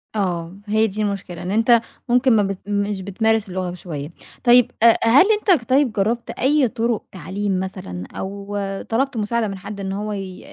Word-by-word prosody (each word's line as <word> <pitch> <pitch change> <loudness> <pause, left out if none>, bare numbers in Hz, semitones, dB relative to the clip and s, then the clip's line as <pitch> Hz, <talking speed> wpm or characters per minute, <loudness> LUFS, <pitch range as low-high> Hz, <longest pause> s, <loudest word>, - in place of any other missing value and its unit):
آه، 180 -3 -2
هي 220 +1 +3
دي 215 +1 -4
المشكلة، 195 -4 -3
إن 180 - -4
أنت 230 +2 +4 0.3
ممكن 250 0 +4
ما 210 - +4
بت 195 -1 -3
مش 200 -1 -1
بتمارس 220 +2 0
اللغة 185 -1 -3
شوية. 155 -5 -6 0.3
طيب، 245 -1 +6
آآ، 230 -1 +7
هل 235 +9 +6
أنت 380 - +2
طيب 260 -2 +3
جرّبت 225 +4 -1
أي 280 0 +2
طُرُق 230 -1 -1
تعليم 190 +2 -3
مثلًا 185 - -6
أو 200 +1 -5 0.3
طلبْت 260 +2 0
مساعدة 220 +1 0
من 195 -1 -5
حد 200 +2 -8
إن 195 -1 -3
هو 210 +2 -3
ي 195 -2 -6
205 Hz, 175 wpm, -21 LUFS, 190-235 Hz, 0.3 s, آآ